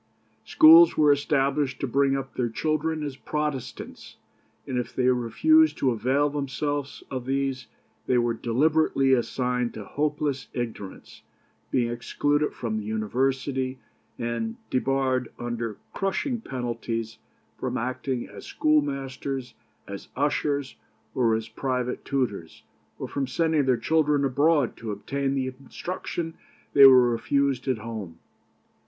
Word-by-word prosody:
Schools 330 +1 +8
were 150 -1 +5
established 140 -1 +1
to - - -1
bring 135 +1 +2
up 135 0 -6
their 120 -2 -1
children 155 +4 -1
as 145 -3 -4
Protestants; 150 -2 -5 0.5
and 125 -1 -2
if 120 -1 -5
they 125 -1 +2
refused 300 - +3
to 130 - +2
avail 130 +5 +1
themselves 145 0 -3
of 130 -2 -4
these, 135 -1 -1 0.4
they 125 - +3
were 120 -1 +2
deliberately 135 +3 +2
assigned 125 -1 0
to 105 - -7
hopeless 150 -2 -2
ignorance, 115 -6 -6 0.5
being 120 -2 +1
excluded 145 +5 0
from 110 -2 -3
the - - -6
university, 130 +5 -1 0.4
and 120 - -3 0.2
debarred, 130 -1 0
under 120 -3 -4 0.2
crushing 225 +5 -1
penalties, 115 - -4 0.4
from - - -2
acting 125 +1 -3
as 100 -1 -11
schoolmasters, 135 -4 -1 0.3
as 100 0 -8
ushers, 145 -1 -1 0.4
or 115 -3 +2
as 110 0 -3
private 125 -1 -3
tutors, 120 - -3 0.3
or - - -5
from 140 -2 -2
sending 160 +1 +1
their 130 -2 +3
children 150 +2 +2
abroad 145 0 +2
to 115 - -7
obtain 135 +7 -2
the 130 -1 -2
instruction 165 +3 -5 0.4
they 140 -1 +10
were 125 -2 +6
refused 135 +2 0
at 130 -3 +1
home. 110 -7 -7
135 Hz, 125 wpm, -26 LUFS, 120-145 Hz, 0.5 s, they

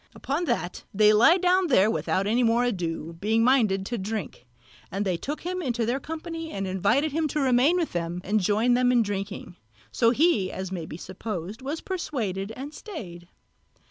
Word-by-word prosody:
Upon 295 +6 -2
that 175 - -2
they 210 +1 +5
lay 240 - +6
down 365 0 +3
there 220 - +4
without 195 -3 0
more 235 +2 +2
ado, 170 -8 -2
being 220 +2 +2
minded 220 -7 +3
to 240 +2 -3
drink, 190 - -5 0.4
and 195 +2 -2
they 185 -2 +1
took 290 - -5
him 365 +1 -3
into 240 -6 -1
their 245 +4 0
company 325 +2 -6
and 195 0 -3
invited 200 - +1
him 315 +2 0
to 300 - -2
remain 270 +5 +3
with 340 -3 -1
them 170 0 -3
and 215 +3 +1
join 215 +5 +2
them 250 0 +3
in 240 -2 +4
their - - -7
drinking: 195 -3 -5 0.3
so 230 - +3
he 245 - +2
(as 190 0 -5
may 170 -4 -4
be 155 - -7
supposed) 190 +2 -6
was 285 +5 -4
persuaded 225 - -3
and 280 +4 -7
stayed. 180 - -9
225 Hz, 185 wpm, -26 LUFS, 190-285 Hz, 0.4 s, lay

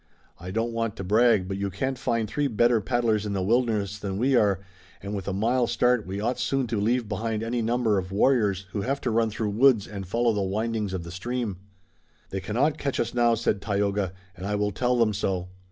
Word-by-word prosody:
I 90 +2 -7
don't 115 +4 -1
want 115 -2 -2
to - - -6
brag, 110 0 +3
but 95 0 -3
you 100 0 -2
can't 130 +8 -2
find 115 -3 -1
three 145 +6 0
better 120 -1 +3
paddlers 115 -1 +1
in 105 -1 -3
the 95 -2 -1
wilderness 105 -2 +1
than 95 -2 -4
we 130 +5 +2
are, 100 -5 +3 0.4
and 100 +1 -6
with 100 -2 -4
a - - 0
mile 115 +5 +1
start 125 -4 +2
we 95 +2 -4
ought 120 +4 -1
soon 135 -1 0
to 110 -3 -1
leave 120 +2 +1
behind 110 +1 -2
any 120 +1 -1
number 115 -3 +1
of 90 0 -6
warriors 100 -3 +2
who 100 - -2
have 135 +6 -1
to 125 - -1
run 115 0 +2
through 110 0 -2
the 105 - -5
woods 130 -6 +5
and 100 -3 -7
follow 115 +4 +1
the 105 - -1
windings 105 +1 -1
of 90 -2 -3
the 85 - -8
stream." 115 +1 -3 0.7
"They 95 - -2
cannot 125 +10 0
catch 140 -2 -2
us 115 - -1
now," 120 -1 +3
said 105 -3 0
Tayoga, 100 -2 0 0.2
"and 95 +2 -6
I 105 - 0
will 105 0 0
tell 125 +5 +1
them 115 -3 +3
so." 90 -2 -2
110 Hz, 230 wpm, -26 LUFS, 100-120 Hz, 0.7 s, woods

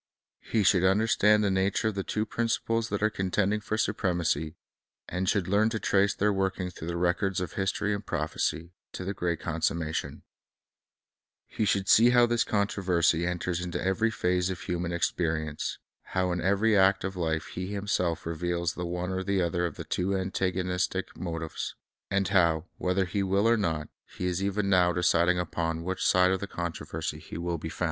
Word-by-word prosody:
He 110 -2 0
should 95 -2 +4
understand 105 +2 +4
the 100 - +2
nature 95 +4 +1
of - - -4
the 95 -1 -3
two 110 +3 -1
principles 115 0 -1
that 105 0 -2
are 110 - +4
contending 100 +2 0
for 105 +1 -3
supremacy, 85 -7 0 0.5
and 90 +1 -1
should 100 -5 +1
learn 105 +3 +3
to 110 -1 -3
trace 100 0 +2
their 105 +1 +2
working 95 -1 -1
through 80 - -8
the 85 0 -2
records 90 +2 +1
of 90 - -4
history 100 +2 -1
and 100 0 -4
prophecy, 80 +2 -2 0.2
to - - -5
the 100 - -2
great 85 -3 -2
consummation, 80 -1 -2 1.4
lie 110 - +3
should 100 -1 +1
see 115 +2 +7
how 120 -1 +6
this 120 0 +1
controversy 90 -5 +1
enters 90 0 -2
into 90 0 -3
every 95 +5 +1
phase 90 -4 0
of 95 -2 -4
human 90 -1 -2
experience; 80 -3 -1 0.2
how 95 -1 -1
in 90 0 -1
every 100 +4 +3
act 95 0 +4
of 95 +1 -3
life 80 -3 -2
he 90 +1 -4
himself 100 -4 -1
reveals 85 +1 -1
the 90 0 -4
one 90 +1 -3
or 95 0 -1
the 100 0 0
other 85 0 0
of 80 - -8
the - - -6
two 95 +2 0
antagonistic 90 -1 -1
motives; 80 -2 -4 0.3
and 95 -1 +1
how, 85 -4 +3
whether 90 +1 +1
he 100 +3 -2
will 100 +3 +2
or 115 - +5
not, 80 -8 -1 0.3
he 90 - -2
is 90 +1 -1
even 100 +1 0
now 90 -2 +4
deciding 90 0 +3
upon 80 -1 -2
which 95 +2 -3
side 90 0 +4
of 95 - 0
the 100 - -5
con 85 -3 -3
troversv - - -5
he - - -8
will 85 -1 -2
be 80 - -5
found. - - -11
90 Hz, 185 wpm, -28 LUFS, 85-100 Hz, 1.4 s, see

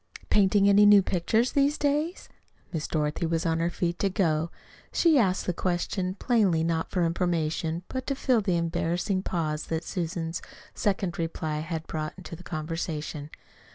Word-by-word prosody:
"Painting 200 0 +4
any 200 +1 +6
new 205 -1 +8
pictures 220 +8 +1
these 285 +1 +2
days?" 295 +5 -1 0.5
Miss 155 -2 -2
Dorothy 155 +1 -1
was 165 0 -1
on 165 0 +1
her 170 +1 +1
feet 175 0 -2
to 200 - +2
go. 170 -5 +1 0.4
She 325 -5 +4
asked 190 -5 +1
the 180 - 0
question 180 +1 -1
plainly 200 -8 +2
not 165 -1 -1
for 180 -2 +1
information, 165 -1 -1
but 260 0 -5
to 275 - 0
fill 255 -4 +2
the 185 -4 +1
embarrassing 175 +3 0
pause 155 -5 -2
that 160 0 -2
Susan's 165 -2 -3 0.3
second 190 -4 -1
reply 160 -2 -2
had 160 0 -4
brought 155 +4 -5
to 170 - -7
the 170 - -13
conversation. 155 -3 -4
175 Hz, 160 wpm, -27 LUFS, 165-200 Hz, 0.5 s, new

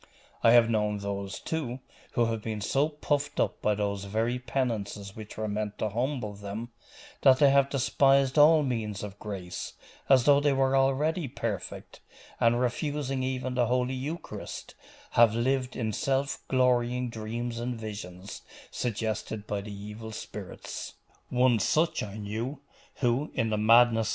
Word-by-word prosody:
I 115 - +6
have 120 -1 +7
known 105 -2 +1
those, 100 -1 -4
too, 135 -6 -3 0.3
who 120 - +3
have 115 -1 -2
been 110 -1 -4
so 135 +8 +1
puffed 145 -1 -2
up 105 - 0
by 105 0 +2
those 100 -1 -2
very 115 +5 -1
penances 105 -6 -3
which 110 -1 -9
were 110 0 -2
meant 105 0 -3
to 110 - -1
humble 120 -1 -2
them, 100 +3 -6 0.5
that 130 -2 +7
they 140 -1 +6
have 140 0 +4
despised 135 0 +3
all 155 +1 +7
means 110 -7 -2
of 105 -1 -7
grace, 95 -4 -6 0.4
as 130 -3 +6
though 140 +1 +6
they 145 -1 +2
were 135 0 +2
already 140 +4 +2
perfect, 115 -6 -5 0.4
and 120 +1 +3
refusing 135 +1 -1
even 130 0 -2
the 125 -2 +2
Holy 125 +1 +1
Eucharist, 145 +6 -6 0.4
have 115 -2 +5
lived 130 +2 0
in 110 -3 -2
self 135 0 0
glorying 125 -1 +2
dreams 115 +2 -4
and 120 0 -3
visions 100 -3 -7 0.3
suggested 110 -2 -3
by 105 -1 -2
the 105 +1 -8
evil 105 +2 -8
spirits. - - -7 0.3
One 125 -2 +3
such 160 - +2
I 100 0 -6
knew, 110 +7 -4 0.4
who, 125 +4 +1
in 115 -1 0
the 105 - +1
madness? 115 0 +5
120 Hz, 155 wpm, -28 LUFS, 105-135 Hz, 0.5 s, have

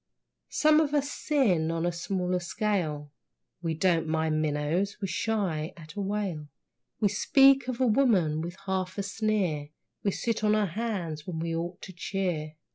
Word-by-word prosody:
Some 310 0 +4
of 300 -2 +1
us 285 0 +1
sin 200 - +1
on 165 0 -1
a 175 - +1
smaller 180 +1 -1
scale. 170 -6 -2 0.5
(We 165 -2 -1
don't 165 -1 +2
mind 160 -1 +1
minnows, 155 +6 0
we 195 - -2
shy 175 -4 -1
at 155 -2 -11
a 205 - -4
whale.) 195 -6 -2 0.5
We 210 - +4
speak 270 +5 +5
of 255 -1 -3
a 260 - +3
woman 210 - +3
with 175 +3 -6
half 185 -1 -2
a 200 - -1
sneer, 200 -8 -1 0.3
We 200 - +1
sit 225 +2 -2
on 210 0 +4
our 215 -1 +2
hands 180 -6 -3
when 175 -3 -4
we 165 0 -2
ought 175 +2 -4
to 185 - -8
cheer. 170 -4 -2
185 Hz, 170 wpm, -28 LUFS, 160-215 Hz, 0.5 s, speak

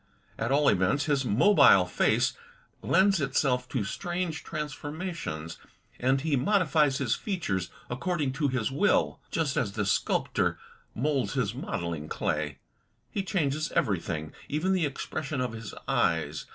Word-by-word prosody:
At 115 +3 -1
all 145 +1 +3
events, 145 +1 +3
his 140 -3 +1
mobile 125 - +6
face - - +2 0.5
lends 195 -2 +3
itself 130 -2 +1
to 125 -6 -1
strange 175 - -3
transformations, 150 - -5 0.4
and 130 +2 +2
he 155 -1 +1
modifies 150 -2 +3
his 130 -5 0
features 100 - -2 0.2
according 145 +1 -1
to 145 +1 0
his 130 -2 -1
will, 180 +10 +2
just 155 -4 -1
as 100 -3 0
the 105 -1 -1
sculptor 95 - +1 0.4
moulds 135 +1 0
his - - 0
modelling 85 -3 -4
clay. 75 -2 -2 0.5
He 200 - -1
changes 155 -5 -1
everything, 80 - -1 0.2
even 155 +6 +1
the 175 -5 +2
expres 145 +2 -5
sion 150 - -2
of 125 -2 -1
his 110 -2 -7 0.2
eyes. 75 -3 0
140 Hz, 140 wpm, -28 LUFS, 110-160 Hz, 0.5 s, mobile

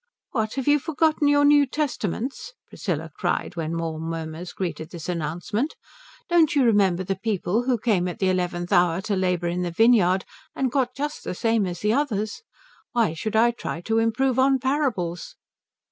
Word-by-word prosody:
"What, 220 -2 -1
have 270 -1 -3
you 295 0 +5
forgotten 310 0 +1
your 290 0 +4
New 290 -1 +5
Testaments?" 270 - -3
Priscilla 160 -4 -4
cried, - - -2
when 165 0 -3
more 165 -1 -3
murmurs 165 +1 -5
greeted 165 -4 -4
this 170 -4 -8
announcement. 175 - -2 0.5
"Don't 335 -4 +3
you 280 - +4
remember 195 -6 +3
the 195 +1 -2
people 215 +2 -1
who 255 -2 +2
came 205 -5 +1
at 175 - -5
the 190 - +1
eleventh 175 0 -2
hour 175 -1 +4
to 200 +1 -1
labour 180 -2 0
in 175 +1 -2
the 180 - -1
vineyard 190 -1 +4 0.3
and 265 -2 0
got 255 -2 0
just 295 +2 -4
the - - -4
same 225 -1 +1
as 175 -1 -5
the 210 +1 +2
others? 225 - -1 0.5
Why 230 -9 +2
should 215 +6 -4
I 235 +2 +5
try 235 -7 -5
to 225 +4 +1
improve 245 +3 +1
on 270 +1 +4
parables?" 260 - -2
210 Hz, 175 wpm, -24 LUFS, 175-260 Hz, 0.5 s, you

